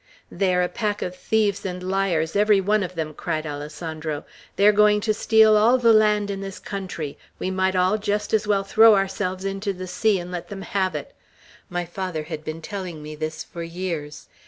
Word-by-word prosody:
"They 190 -2 +1
are 180 - +3
a - - +1
pack 210 +1 -2
of 180 - -4
thieves 205 +2 0
and 180 -1 -5
liars, 185 -4 0
every 210 0 +4
one 205 +2 +2
of 185 -1 -4
them!" 155 -2 -3
cried 155 0 -3
Alessandro. 150 +1 -5 0.3
"They 200 - +3
are 210 - +8
going 210 0 +4
to 215 0 +1
steal 220 0 +5
all 225 +4 +5
the 230 -2 +5
land 210 -1 +3
in 195 0 -4
this 195 0 -6
country; 185 -7 -6 0.2
we 185 - -3
might 190 0 +1
all 185 +4 +2
just 210 0 -2
as 215 -1 +2
well 200 -2 +2
throw 220 +2 +6
ourselves 195 -1 -1
into 195 +1 -2
the 185 0 -7
sea, 210 +3 +1
and 175 0 -6
let 175 -1 -5
them 195 -1 -7
have 190 -2 -1
it. - - -6 0.6
My 175 0 -2
father 175 -2 -4
had 155 -1 -6
been 160 +1 -6
telling 185 -6 -6
me 150 0 -7
this 155 +1 -4
for 170 - -9
years. 165 -3 -5
190 Hz, 205 wpm, -23 LUFS, 170-205 Hz, 0.6 s, are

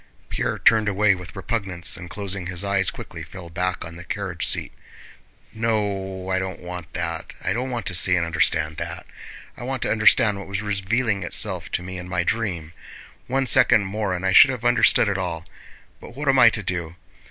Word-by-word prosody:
Pierre - - -2
turned 110 -2 +4
away 105 0 +3
with 90 -6 -9
repugnance, 90 -7 -1
and 85 0 -9
closing 95 -1 -4
his 90 +1 -5
eyes 100 -1 +1
quickly - - -9
fell 85 -3 -10
back 90 +1 -2
on 80 +1 -10
the 85 - -9
carriage 90 -1 -2
seat. - - 0 0.8
"No, 100 -4 -2
I 95 - +1
don't 95 -1 -5
want 90 -2 -8
that, 85 -1 -4
I - - +1
don't 125 +3 -2
want 120 -4 -4
to 95 - -1
see 90 +1 +4
and 85 -1 +1
understand 80 -1 0
that. - - -6 0.5
I - - -12
want 130 0 -3
to - - -1
understand 110 -1 +4
what 100 - -8
was 100 +1 -3
revealing 105 +2 0
itself - - +1
to 90 - -1
me 90 0 -6
in 90 0 -8
my 85 -1 0
dream. 85 -6 -2 0.5
One 135 +1 0
second 125 -4 +5
more 100 -1 -2
and 90 +1 -4
I 95 - +2
should - - +9
have 125 -2 -4
understood 120 -2 +5
it 100 -1 -1
all! 85 -3 -4 0.5
But 120 - -12
what 145 +1 -5
am 135 -1 +4
I 120 - +9
to 110 -2 -5
do? 85 -3 -2
95 Hz, 200 wpm, -23 LUFS, 90-110 Hz, 0.8 s, should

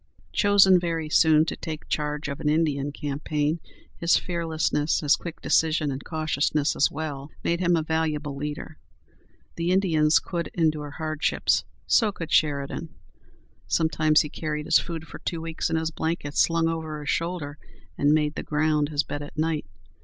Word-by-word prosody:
Chosen 195 -3 +6
very 165 -3 -2
soon 155 -1 +5
to - - -3
take 155 -2 -7
charge 150 0 -2
of 140 -1 -5
an 150 - 0
Indian 150 -3 +1
campaign, 150 +2 -2 0.4
his 170 0 +3
fearlessness, 160 -3 0
his 150 0 +4
quick 170 -2 -8
decision 155 -2 +2
and 135 +1 -5
cautiousness 155 -2 0
as - - +3
well, 145 -2 -5
made 170 0 0
him 175 -1 +3
a 160 - 0
valuable 155 -2 -1
leader. 150 +2 -6 0.8
The 170 +1 -1
Indians 165 -5 +3
could 170 -2 -3
endure 155 -3 0
hardships; 155 0 0 0.2
so 220 -4 +3
could 165 -4 -7
Sheridan. 150 +2 0 0.7
Sometimes 155 -1 +3
he 150 - -4
carried 150 0 -4
his - - +5
food 165 -2 -5
for - - -10
two 170 - -3
weeks 165 0 -3
in 165 - 0
his 160 0 -1
blanket, 160 -3 -3
slung 165 -1 +3
over 160 -2 -3
his 150 - -5
shoulder, 165 -4 -3 0.4
and 145 +1 +3
made 150 -1 +2
the - - -4
ground 150 -1 +1
his 150 -1 +1
bed 145 - -5
at 145 - -9
night. 155 -7 -1
155 Hz, 165 wpm, -25 LUFS, 150-165 Hz, 0.8 s, Chosen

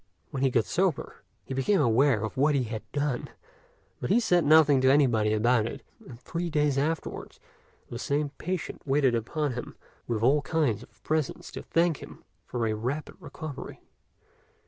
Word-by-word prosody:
When 135 - -3
he 135 - +4
got 115 -4 +2
sober, 85 - -1 0.2
he - - -5
became 155 +10 +2
aware 125 -2 +3
of 110 - -4
what 145 +2 +3
he 135 - +2
had 110 -1 -5
done; 145 -3 -2 0.7
but - - -4
he - - +5
said 180 -7 +3
nothing 150 -2 +6
to 130 - +4
anybody 120 -7 +3
about 110 +1 +2
it, - - -7 0.2
and 120 -3 -11
three 170 +6 -4
days 150 -3 +1
afterwards 155 +4 -3 0.5
the 120 - -7
same 145 +3 -1
patient 180 0 -4
waited 135 -2 +2
upon 130 +5 -1
him 120 - -7 0.3
with 115 -2 -1
all 140 +5 +4
kinds 145 -7 0
of 115 - -18
presents 155 -3 -2
to - - -6
thank 165 -2 +1
him - - -12 0.2
for 120 -2 -2
a 110 - 0
rapid 125 +8 -3
recovery. 155 -4 -8
135 Hz, 170 wpm, -28 LUFS, 120-150 Hz, 0.7 s, nothing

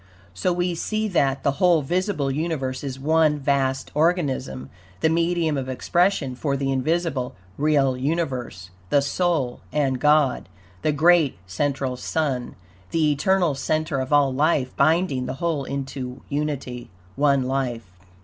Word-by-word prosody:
So 140 - 0
we 175 0 0
see 215 +6 -2
that, 140 -7 +1
the 140 -1 0
whole 175 -4 +4
visible 175 -2 -1
universe 135 -4 -2
is 135 -2 -4
one 155 +1 +3
vast 135 -2 0
organism, 145 - 0 0.3
the 160 - +3
medium 165 -2 +1
of 130 0 -5
expression 165 +1 +1
for 140 +2 -2
the 135 0 -1
invisible, 135 -1 -1 0.2
real 140 -3 +2
universe 130 - -3 0.2
the 140 +3 +3
soul 145 -4 0
and 135 -4 0
God, 150 -6 +3 0.3
the 155 - +1
great 155 - +4
central 130 +7 -2
Sun, 135 -3 -2 0.3
the 155 -2 +2
eternal 175 +2 +2
center 155 +1 -1
of 130 +1 -4
all 145 -2 +4
life, 145 -2 +1
binding 155 -4 +2
the 130 - -4
whole 155 -2 -1
into 135 -2 -5
unity 140 -4 -3 0.3
ONE 140 -1 +3
LIFE. 125 -3 -2
140 Hz, 140 wpm, -23 LUFS, 130-160 Hz, 0.3 s, whole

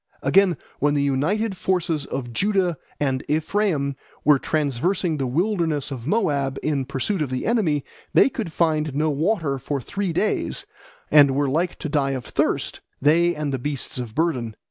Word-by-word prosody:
Again, 195 -5 +4 0.2
when 145 +1 +2
the 140 - +2
united 190 +11 0
forces 170 -5 0
of 120 -3 -4
Judah 190 - +1 0.2
and 135 -3 0
Ephraim 155 -3 0 0.3
were 150 -2 +6
traversing 155 +4 0
the 135 -2 -1
wilderness 160 - 0
of 130 -2 -6
Moab 145 -9 +1
in 140 -3 0
pursuit 140 +8 -2
of 145 - -1
the 130 0 -3
enemy, 175 - +1 0.3
they - - +6
could 225 -10 -4
find 155 -4 +1
no 155 +1 +1
water 155 -2 0
for 140 +2 -2
three 195 +8 -3
days, 200 +6 0 0.5
and 140 -3 +7
were 145 0 +2
like 165 +6 0
to - - -4
die 140 -2 +1
of 125 - -8
thirst, - - -1 0.2
they 170 +4 +3
and 150 -2 -2
the 135 - -1
beasts 140 -1 -3
of 120 -3 -6
burden. 130 -9 0
150 Hz, 165 wpm, -23 LUFS, 135-175 Hz, 0.5 s, and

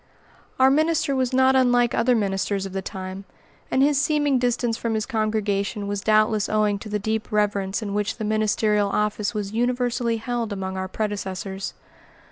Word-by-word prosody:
Our 260 +1 +6
minister 310 -1 +2
was 260 -1 0
not 260 0 +4
unlike 245 -2 +3
other 240 +2 +3
ministers 195 -2 -1
of 195 - -7
the 195 - -2
time, 190 0 -6 0.5
and 265 - +3
his 285 -1 +3
seeming 290 -3 +2
distance 245 -1 0
from 230 -1 -2
his 215 - -1
congregation 215 -2 -1
was 200 0 -2
doubtless 215 0 +2
owing 210 -1 +1
to 215 - -9
the 210 - 0
deep 220 +3 -3
reverence 205 -1 0
in 200 -1 -4
which 205 0 -1
the 220 - -3
ministerial 215 -1 +1
office 210 +1 -1
was 205 -1 -3
universally 245 0 0
held 235 -1 -3
among 190 -1 -4
our 190 0 -3
predecessors. 195 -2 -4
215 Hz, 170 wpm, -23 LUFS, 200-245 Hz, 0.5 s, Our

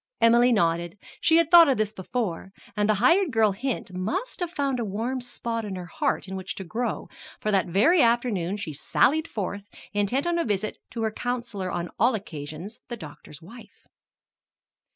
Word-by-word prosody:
Emily 235 +2 +5
nodded; 170 -3 +1 0.2
she 325 - +4
had 335 0 +2
thought 340 -3 +9
of 265 - +2
this 215 -1 0
before. 190 -2 -3 0.2
And 210 0 +1
the 215 - +4
hired 325 - +4
girl 220 -3 +3
hint 230 -2 -4
must 340 - -3
have 355 -2 -2
found 280 -6 -1
a - - 0
warm 225 +6 -2
spot 235 -2 -4
in 200 -3 -5
her 180 -1 -6
heart 175 - -1
in 190 - -5
which 190 -1 -5
to 195 - -6
grow, 230 +7 -3 0.3
for 215 - -1
that 195 -3 +2
very 245 - +4
afternoon 230 -6 +1
she 160 -7 -5
sallied 305 - +2
forth, 200 - -5 0.2
intent 205 - 0
on 345 0 +1
a - - +2
visit 210 -1 -2
to 230 - -4
her 220 - 0
counselor 235 -5 -3
on 175 -1 -3
all 240 +4 +4
occasions 165 +1 -7
the 240 - -6
doctor's 150 -2 -11
wife. 230 +7 -14
215 Hz, 185 wpm, -26 LUFS, 190-250 Hz, 0.3 s, thought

